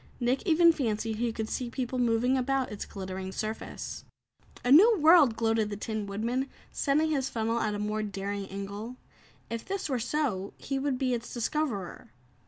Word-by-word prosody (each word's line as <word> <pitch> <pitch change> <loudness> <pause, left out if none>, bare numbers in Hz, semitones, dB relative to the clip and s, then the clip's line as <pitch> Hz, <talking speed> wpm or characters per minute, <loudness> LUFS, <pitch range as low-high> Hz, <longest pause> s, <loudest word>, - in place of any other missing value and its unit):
Nick 250 +2 +1
even 335 0 +6
fancied 225 -5 -1
he 235 +1 0
could 220 -1 -4
see 245 +1 -3
people 255 0 -3
moving 240 +2 +2
about 265 0 0
its 210 - -6
glittering 190 -1 -5
surface. 215 +3 -5 0.6
"A 245 - +2
new 420 - +8
world!" 310 -7 +6
gloated 225 -2 +1
the 205 - -4
Tin 215 0 -3
Woodman, 235 +7 -2 0.2
setting 305 +3 +1
his 270 -3 0
funnel 230 +1 -1
at 210 -2 0
a - - -2
more 210 +1 -1
daring 200 -1 -4
angle. 200 +5 -6 0.6
If 230 -1 -3
this 390 -4 -3
were 260 -3 0
so, 230 -7 -1
he 275 -1 -3
would 275 -1 0
be 255 -1 0
its 240 0 -4
discoverer. 240 - -2
235 Hz, 175 wpm, -29 LUFS, 210-270 Hz, 0.6 s, new